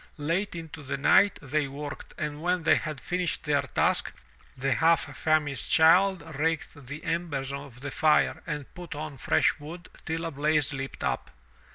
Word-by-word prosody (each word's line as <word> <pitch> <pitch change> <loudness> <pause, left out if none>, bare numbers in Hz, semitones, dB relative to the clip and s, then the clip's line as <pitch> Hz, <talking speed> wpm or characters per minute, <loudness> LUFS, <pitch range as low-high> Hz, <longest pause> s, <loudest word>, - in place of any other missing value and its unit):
Late 170 +7 -1
into 165 -2 -7
the 140 0 -3
night 195 +7 +5
they 145 +1 0
worked 145 +1 -7
and 150 0 -4
when 180 0 0
they - - +5
had 155 -4 -1
finished 180 +1 -2
their - - +2
task, - - +1 0.5
the 135 +2 0
half 165 +1 +2
famished 150 -3 0
child 180 +4 +5 0.2
raked 155 -3 -2
the 145 +3 -7
embers 160 -5 -2
of 140 -3 -8
the 140 0 -5
fire 155 +1 +3
and 150 -3 -5
put 175 -3 -8
on 150 -1 -6
fresh - - +2
wood 165 +4 -9
till 165 0 -3
a 165 - -3
blaze 150 0 +1
leaped 135 0 -5
up. 60 - -1
155 Hz, 170 wpm, -28 LUFS, 140-165 Hz, 0.5 s, night